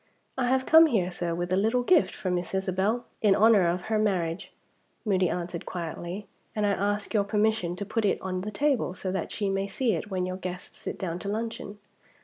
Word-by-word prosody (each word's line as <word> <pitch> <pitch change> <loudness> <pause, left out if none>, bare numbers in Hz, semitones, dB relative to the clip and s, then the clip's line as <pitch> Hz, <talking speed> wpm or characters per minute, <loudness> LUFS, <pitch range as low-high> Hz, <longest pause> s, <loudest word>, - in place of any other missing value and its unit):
"I 255 -2 0
have 260 +1 +2
come 320 +1 +8
here, 190 - +1
sir, 175 -1 -2
with 175 +1 -2
a - - +5
little 225 +6 +2
gift 345 +5 +3
for 185 - -3
Miss 180 +1 -2
Isabel, 190 +5 0 0.2
in 205 -3 +5
honor 210 -4 +5
of 175 +1 -1
her 220 -1 0
marriage," 180 -5 -1 0.5
Moody 185 -4 +2
answered 175 -1 -4
quietly, 175 +3 -5 0.3
"and 210 -1 +1
I 205 - +3
ask 205 +2 -1
your 210 -2 +3
permission 210 -3 +1
to 200 - -4
put 220 +2 -1
it 200 - +2
on 185 -1 -3
the 210 - -4
table, 250 -3 0
so 185 0 -3
that 190 -2 -3
she 205 - -2
may 195 0 0
see 225 +3 0
it 175 +4 -3
when 185 -2 -1
your 185 0 -4
guests 180 -1 -7
sit - - -5
down 175 -2 -3
to 200 - -5
luncheon." 215 -1 -4
195 Hz, 215 wpm, -27 LUFS, 180-220 Hz, 0.5 s, come